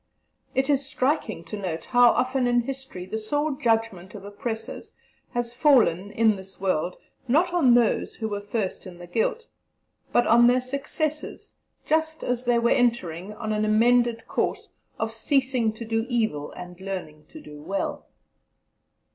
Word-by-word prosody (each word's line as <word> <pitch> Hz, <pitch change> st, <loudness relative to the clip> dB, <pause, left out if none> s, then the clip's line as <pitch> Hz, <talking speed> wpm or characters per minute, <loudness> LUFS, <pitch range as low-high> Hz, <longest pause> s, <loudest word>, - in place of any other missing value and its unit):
It 265 Hz, 0 st, +2 dB
is 285 Hz, -2 st, +2 dB
striking 265 Hz, -, -1 dB
to 210 Hz, -, -7 dB
note 180 Hz, -6 st, -4 dB
how 245 Hz, -1 st, +6 dB
often 255 Hz, 0 st, +1 dB
in 240 Hz, 0 st, +3 dB
history 265 Hz, -7 st, -6 dB
the 220 Hz, +4 st, -4 dB
sore 290 Hz, +8 st, -1 dB
judgment 225 Hz, -7 st, -1 dB
of 200 Hz, -1 st, -9 dB
oppressors 220 Hz, +2 st, -6 dB, 0.4 s
has 240 Hz, -1 st, -3 dB
fallen 240 Hz, -, +3 dB
(in 220 Hz, 0 st, +2 dB
this 190 Hz, 0 st, -11 dB
world), 180 Hz, -2 st, -1 dB, 0.3 s
not 330 Hz, +8 st, +2 dB
on 270 Hz, -9 st, +5 dB
those 240 Hz, -2 st, +2 dB
who 220 Hz, -, -3 dB
were 205 Hz, -1 st, -3 dB
first 205 Hz, -2 st, -3 dB
in 175 Hz, -2 st, -10 dB
the 175 Hz, -, -10 dB
guilt, 225 Hz, -, -1 dB, 0.7 s
but 240 Hz, -, +3 dB
on 235 Hz, +1 st, +6 dB
their 250 Hz, +1 st, +4 dB
successors, 280 Hz, +4 st, -3 dB, 0.3 s
just 315 Hz, 0 st, 0 dB
as 245 Hz, 0 st, -1 dB
they 240 Hz, 0 st, +3 dB
were 235 Hz, 0 st, +2 dB
entering 210 Hz, -6 st, 0 dB
on 215 Hz, 0 st, -3 dB
an 210 Hz, 0 st, 0 dB
amended 230 Hz, +2 st, +3 dB
course -, -, -2 dB, 0.3 s
of 225 Hz, 0 st, -2 dB
"ceasing 255 Hz, 0 st, +1 dB
to 230 Hz, +1 st, -8 dB
do 225 Hz, +1 st, -1 dB
evil 220 Hz, -, -1 dB
and 180 Hz, 0 st, -10 dB
learning 180 Hz, -6 st, -6 dB
to 315 Hz, -, -12 dB
do 150 Hz, -, -12 dB
well." 195 Hz, +6 st, -3 dB
230 Hz, 160 wpm, -25 LUFS, 195-255 Hz, 0.7 s, how